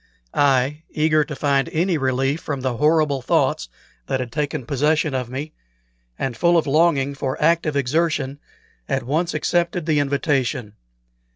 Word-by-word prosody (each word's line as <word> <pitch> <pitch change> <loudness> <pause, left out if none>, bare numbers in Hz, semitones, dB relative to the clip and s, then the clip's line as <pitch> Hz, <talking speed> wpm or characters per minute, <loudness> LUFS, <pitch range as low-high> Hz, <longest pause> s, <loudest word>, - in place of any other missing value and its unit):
I, 140 +1 +2
eager 155 0 +2
to 150 0 -7
find 140 -2 +1
any 175 +3 +1
relief 135 +1 0
from 140 -3 -4
the 125 -2 -2
horrible 150 -2 +2
thoughts - - +1 0.4
that 135 - -1
had 125 -2 -4
taken 145 -3 -2
possession 150 +2 +1
of 125 -2 -2
me, 140 +5 -5 0.6
and 130 -3 -3
full 170 +7 +3
of 165 - +2
longing 145 -2 +2
for 135 -1 -3
active 160 -1 +2
exertion, 145 0 0 0.5
at - - 0
once 160 +7 -1
accepted 175 -1 0
the 155 -2 +2
invitation. 135 -5 -1
145 Hz, 150 wpm, -21 LUFS, 135-155 Hz, 0.6 s, full